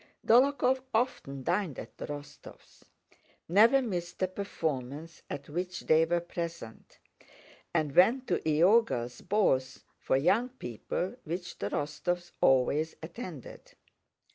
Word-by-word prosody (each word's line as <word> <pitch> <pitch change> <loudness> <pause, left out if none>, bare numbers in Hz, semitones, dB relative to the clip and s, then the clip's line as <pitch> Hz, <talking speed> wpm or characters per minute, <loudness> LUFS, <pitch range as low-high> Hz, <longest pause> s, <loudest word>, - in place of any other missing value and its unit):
Dólokhov 260 +2 +4
often 140 - -1
dined 175 - -1
at 115 - -9
the - - -5
Rostóvs', 145 0 -10 0.7
never 230 +10 +5
missed 175 -7 -4
a - - +3
performance 160 -5 -4
at 140 - -6
which 180 +4 -4
they 160 +1 +4
were 175 +1 +1
present, 170 -9 -7 0.7
and 155 -4 0
went 240 +9 +5
to - - 0
Iogel's 155 - +2
balls 135 -11 +1 0.2
for 130 - +1
young 200 - +2
people 185 - -5
which 175 +2 -5
the 100 - -2
Rostóvs 175 +6 -2
always 140 +5 +3
attended. 170 - -9
170 Hz, 115 wpm, -30 LUFS, 145-200 Hz, 0.7 s, never